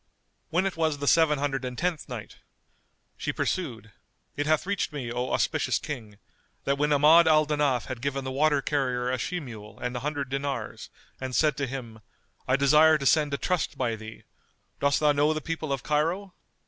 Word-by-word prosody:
When 180 Hz, +4 st, +1 dB
it 195 Hz, -, -1 dB
was 160 Hz, -2 st, +1 dB
the 145 Hz, -, -4 dB
Seven 160 Hz, -2 st, +4 dB
Hundred 135 Hz, -1 st, -2 dB
and 125 Hz, -1 st, -5 dB
Tenth 175 Hz, -4 st, -2 dB
Night, 115 Hz, -5 st, -7 dB, 0.8 s
She -, -, -2 dB
pursued, 115 Hz, -, -3 dB, 0.4 s
It 145 Hz, 0 st, -2 dB
bath 155 Hz, +1 st, +2 dB
reached 200 Hz, -2 st, -1 dB
me, 130 Hz, -6 st, -5 dB
O 125 Hz, +1 st, -2 dB
auspicious -, -, +1 dB
King, 115 Hz, -9 st, -7 dB, 0.5 s
that 140 Hz, 0 st, 0 dB
when 150 Hz, +1 st, +1 dB
Ahmad 155 Hz, +4 st, +6 dB
al 155 Hz, -1 st, +5 dB
Danaf 145 Hz, -4 st, +1 dB
had 130 Hz, -2 st, -6 dB
given 135 Hz, 0 st, -2 dB
the 130 Hz, -, -4 dB
water 145 Hz, +1 st, +2 dB
carrier 125 Hz, -4 st, 0 dB
a 130 Hz, -, -1 dB
she 180 Hz, +8 st, -2 dB
mule 110 Hz, -7 st, -10 dB
and 125 Hz, 0 st, -4 dB
an 125 Hz, -, -3 dB
hundred 145 Hz, -2 st, -3 dB
dinars 140 Hz, +1 st, -4 dB, 0.3 s
and 130 Hz, -1 st, -4 dB
said 155 Hz, -2 st, +3 dB
to 140 Hz, -, -1 dB
him, 120 Hz, -4 st, -7 dB, 0.5 s
"I 130 Hz, -, +3 dB
desire 150 Hz, +3 st, +5 dB
to 140 Hz, -, -5 dB
send 150 Hz, 0 st, +3 dB
a -, -, -3 dB
trust 180 Hz, -4 st, -1 dB
by 120 Hz, -4 st, 0 dB
thee. 110 Hz, 0 st, -10 dB, 0.6 s
Dost 140 Hz, -1 st, +2 dB
thou 150 Hz, -1 st, +5 dB
know 145 Hz, +2 st, +2 dB
the 155 Hz, -, -2 dB
people 160 Hz, -1 st, -4 dB
of 135 Hz, -2 st, -2 dB
Cairo?" 170 Hz, +6 st, 0 dB
140 Hz, 195 wpm, -27 LUFS, 130-155 Hz, 0.8 s, Ahmad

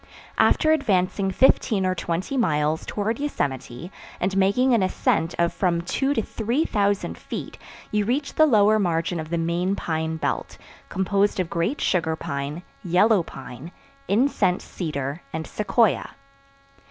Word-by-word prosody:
After 310 Hz, -, +4 dB
advancing 195 Hz, -9 st, +1 dB
fifteen 205 Hz, -2 st, +3 dB
or 185 Hz, -, +1 dB
twenty 180 Hz, +7 st, -3 dB
miles 155 Hz, -, 0 dB
towards 220 Hz, +5 st, -2 dB
Yosemite 140 Hz, -, -3 dB, 0.3 s
and 190 Hz, +1 st, -1 dB
making 200 Hz, +7 st, +3 dB
an 230 Hz, -, +3 dB
ascent 170 Hz, -3 st, 0 dB
of 170 Hz, 0 st, +1 dB
from 175 Hz, -3 st, 0 dB
two 270 Hz, +10 st, 0 dB
to 225 Hz, -, +1 dB
three 235 Hz, +11 st, -1 dB
thousand 205 Hz, -2 st, 0 dB
feet -, -, -7 dB, 0.3 s
you 210 Hz, -1 st, +1 dB
reach 275 Hz, +6 st, -1 dB
the 315 Hz, -, +5 dB
lower 215 Hz, -4 st, +4 dB
margin 170 Hz, -2 st, 0 dB
of 155 Hz, 0 st, -6 dB
the 170 Hz, -, -1 dB
main 170 Hz, +3 st, 0 dB
pine 160 Hz, -3 st, -2 dB
belt, -, -, -3 dB, 0.3 s
composed 195 Hz, +2 st, +1 dB
of 180 Hz, -3 st, -2 dB
great 170 Hz, -, -1 dB
sugar 160 Hz, -3 st, +1 dB
pine, 140 Hz, +3 st, -5 dB, 0.2 s
yellow 185 Hz, +4 st, +4 dB
pine, 135 Hz, 0 st, -10 dB, 0.4 s
incense 200 Hz, -5 st, +2 dB
cedar 145 Hz, -3 st, -4 dB
and 160 Hz, 0 st, -3 dB
sequoia. 210 Hz, +1 st, +1 dB
185 Hz, 140 wpm, -24 LUFS, 165-215 Hz, 0.4 s, the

